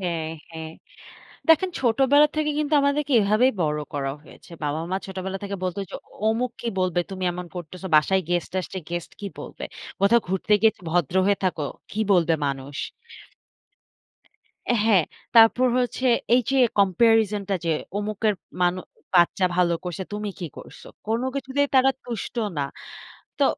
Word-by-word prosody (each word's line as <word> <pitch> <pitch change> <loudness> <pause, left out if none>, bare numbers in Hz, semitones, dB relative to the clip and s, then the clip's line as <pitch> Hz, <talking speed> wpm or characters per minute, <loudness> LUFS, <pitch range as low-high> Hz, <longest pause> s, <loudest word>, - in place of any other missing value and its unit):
হ্যাঁ, 170 -4 -2 0.2
হ্যাঁ। 160 -1 -7 0.8
দেখেন 325 +4 +5
ছোটবেলা 270 +4 +4
থেকে 305 -1 0
কিন্তু 305 0 -1
আমাদেরকে 280 0 +1
এভাবেই 215 +6 +3
বড় 150 0 0
করা 135 -1 -2
হয়েছে। 170 - -17
বাবা-মা 160 +5 -2
ছোটবেলা 190 0 -5
থেকে 200 0 -3
বলতো 185 +2 -2
যে, - - -6 0.3
অমুক 235 +3 0
কি 235 - -3
বলবে, 180 -1 +1
তুমি 185 -1 -5
এমন 180 0 -6
করতেছ। 175 +2 -8
বাসায় 190 +5 +4
গেস্ট 175 -1 -1
আসছে, 190 +1 -7
গেস্ট 175 -1 -4
কি 205 - -4
বলবে? - - -8 0.4
কোথাও 230 +4 +4
ঘুরতে 190 +3 0
গিয়ে 220 0 +6 0.2
ভদ্র 175 +2 0
হয়ে 200 0 +3
থাকো। 160 -5 -1 0.3
কি 215 - -4
বলবে 170 -3 +4
মানুষ? 140 +1 -4 2.1
হ্যাঁ, 200 -7 +5 0.3
তারপর 230 +3 +7
হচ্ছে 255 +1 -1 0.3
এই 250 - +4
যে 270 - +1 0.2
কম্পেরিজন 210 +1 +3
টা 195 - +1
যে, 165 - +1 0.3
"অমুকের 210 0 0 0.3
মানু 180 +1 +2 0.3
বাচ্চা 175 +1 +4
ভালো 175 -1 +3
করছে, 180 +1 -4
তুমি 210 0 -3
কি 175 - -4
করছ?" - - -11 0.3
কোনো 230 +3 0
কিছুতেই 275 +1 0
তারা 265 +1 +6
তুষ্ট 235 -1 -5 0.2
না। 140 - +1 0.7
তো - - +4
195 Hz, 150 wpm, -24 LUFS, 175-235 Hz, 2.1 s, তারপর